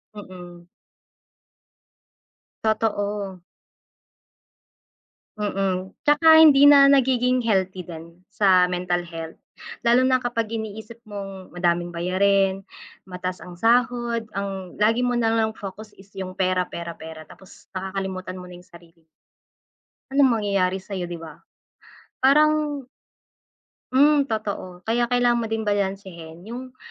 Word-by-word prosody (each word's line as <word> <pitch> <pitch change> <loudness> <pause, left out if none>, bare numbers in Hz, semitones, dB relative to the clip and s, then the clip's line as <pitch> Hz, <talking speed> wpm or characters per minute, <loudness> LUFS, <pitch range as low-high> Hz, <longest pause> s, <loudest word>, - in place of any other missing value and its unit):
Mm. 180 -3 -11 2.0
Totoo. 205 -3 -1 2.0
Mm, 195 -2 -2
tsaka 320 +2 +6
hindi 285 -3 +7
na 280 -1 +8
nagiging 255 -2 +2
healthy 190 -4 0
din, 170 +1 -12
sa 185 -3 +3
mental 180 -1 -2
health. 165 -1 -8 0.5
Lalo 240 +2 +5
na 260 0 +3
kapag 240 -3 -3
iniisip 220 +1 -7
mong 195 -3 -9
madaming 175 0 0
bayarin, 195 +2 +1 0.4
mataas 185 0 -6
ang 180 - -10
sahod, 235 +3 +1
ang 195 -2 -5
lagi 225 +4 +3
mo 245 - 0
nalang 225 -2 +1
focus 210 +1 -9
is 195 +1 -18
yung 185 -1 -5
"pera, 185 -1 0
pera, 170 -1 -7
pera" 160 0 -9
tapos 190 +4 -17
nakakalimutan 190 -1 -5
mo 180 0 -10
na 180 - -11
yung 180 - -16
sarili. 170 -2 -19 1.1
Anong 275 -1 +4
mangyayari 195 -2 0
sayo, 190 -1 -6
'di 175 0 -6
ba? 160 -2 -10 0.8
Parang 300 +1 +3 1.1
Mm, 285 +1 +4
totoo. 200 -5 -5
Kaya 235 +3 0
kailangan 245 -1 +2
mo 230 - -2
din 225 0 -2
balansehin 190 -5 -4
yung, 250 +4 -9
200 Hz, 115 wpm, -23 LUFS, 180-235 Hz, 2.0 s, na